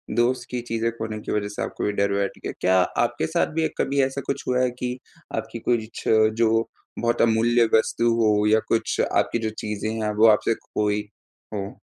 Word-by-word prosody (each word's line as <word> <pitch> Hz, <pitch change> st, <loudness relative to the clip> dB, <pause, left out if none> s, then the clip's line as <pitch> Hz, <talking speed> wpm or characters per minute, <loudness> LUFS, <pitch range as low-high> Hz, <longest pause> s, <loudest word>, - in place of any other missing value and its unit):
दोस्त 120 Hz, +2 st, +1 dB
की 125 Hz, -, -3 dB
चीज़ें 115 Hz, 0 st, 0 dB
खोने 110 Hz, -1 st, -4 dB
की -, -, -6 dB
वजह 105 Hz, -1 st, 0 dB
से 105 Hz, -, -6 dB
आपको -, -, -4 dB
ये 105 Hz, -, +1 dB
डर 100 Hz, 0 st, +2 dB
बैठ 100 Hz, 0 st, 0 dB
गया। -, -, -3 dB
क्या 95 Hz, +1 st, +3 dB, 0.3 s
आपके 120 Hz, +4 st, -1 dB
साथ 160 Hz, -1 st, 0 dB
भी 160 Hz, 0 st, 0 dB
एक -, -, -3 dB
कभी 140 Hz, 0 st, +1 dB
ऐसा 135 Hz, +1 st, -2 dB
कुछ 140 Hz, 0 st, -3 dB
हुआ 125 Hz, 0 st, +2 dB
है 125 Hz, -, +2 dB
कि 125 Hz, 0 st, -3 dB, 0.4 s
आपकी 110 Hz, +1 st, -4 dB
कुछ 115 Hz, -2 st, -1 dB, 0.3 s
जो 115 Hz, -1 st, +3 dB, 0.5 s
बहुत 120 Hz, 0 st, +1 dB
अमूल्य 115 Hz, +1 st, +4 dB
वस्तु 115 Hz, +1 st, +1 dB
हो 105 Hz, -1 st, +3 dB
या 110 Hz, +1 st, +5 dB
कुछ 115 Hz, -, 0 dB
आपकी 115 Hz, -, +1 dB
जो -, -, 0 dB
चीज़ें 105 Hz, 0 st, -3 dB
हैं 105 Hz, -, 0 dB
वो 110 Hz, +2 st, +6 dB
आपसे 110 Hz, +1 st, +4 dB
खोई 105 Hz, 0 st, -2 dB, 0.5 s
हों? 100 Hz, 0 st, -4 dB
115 Hz, 205 wpm, -24 LUFS, 105-120 Hz, 0.5 s, वो